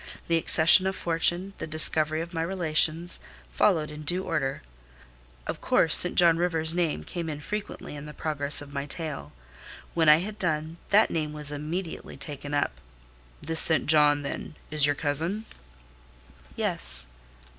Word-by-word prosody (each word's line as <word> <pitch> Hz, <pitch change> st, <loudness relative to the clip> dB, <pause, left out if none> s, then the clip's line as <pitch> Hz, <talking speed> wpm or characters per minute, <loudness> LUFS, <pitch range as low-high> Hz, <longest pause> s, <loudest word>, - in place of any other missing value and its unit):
The 165 Hz, -, +2 dB
accession 165 Hz, +3 st, +4 dB
of 190 Hz, -, -2 dB
fortune, 175 Hz, +3 st, 0 dB
the -, -, -5 dB
discovery 155 Hz, 0 st, +3 dB
of 170 Hz, +1 st, -8 dB
my 165 Hz, -, -2 dB
relations, 165 Hz, -1 st, 0 dB, 0.3 s
followed 160 Hz, -7 st, +1 dB
in 150 Hz, 0 st, -9 dB
due 180 Hz, +5 st, -1 dB
order. 135 Hz, -6 st, -3 dB, 0.8 s
Of -, -, -5 dB
course, 160 Hz, -, +3 dB
St. 180 Hz, -, +5 dB
John 170 Hz, -2 st, +5 dB
Rivers' 165 Hz, -2 st, -1 dB
name 170 Hz, -3 st, -1 dB
came 170 Hz, -3 st, -6 dB
in 150 Hz, -1 st, -5 dB
frequently 205 Hz, -1 st, -7 dB
in 145 Hz, +1 st, -9 dB
the 150 Hz, -, -9 dB
progress 145 Hz, -1 st, -2 dB
of 140 Hz, -1 st, -14 dB
my 140 Hz, 0 st, -4 dB
tale. 150 Hz, -, -4 dB, 0.6 s
When 165 Hz, -2 st, +3 dB
I 150 Hz, -, +8 dB
had 205 Hz, +5 st, -6 dB
done, 160 Hz, -1 st, -2 dB
that 210 Hz, +2 st, +4 dB
name 155 Hz, -2 st, -3 dB
was 150 Hz, -1 st, -5 dB
immediately 160 Hz, +4 st, -6 dB
taken 145 Hz, +1 st, -5 dB
up. 65 Hz, -, -2 dB, 0.6 s
"This 160 Hz, 0 st, +2 dB
St. 160 Hz, -5 st, +7 dB
John, 150 Hz, -1 st, +3 dB
then, 140 Hz, +2 st, -6 dB, 0.2 s
is 150 Hz, -2 st, +3 dB
your 145 Hz, -, 0 dB
cousin?" 165 Hz, +9 st, -1 dB, 1.1 s
"Yes." -, -, -1 dB
160 Hz, 155 wpm, -26 LUFS, 150-170 Hz, 1.1 s, I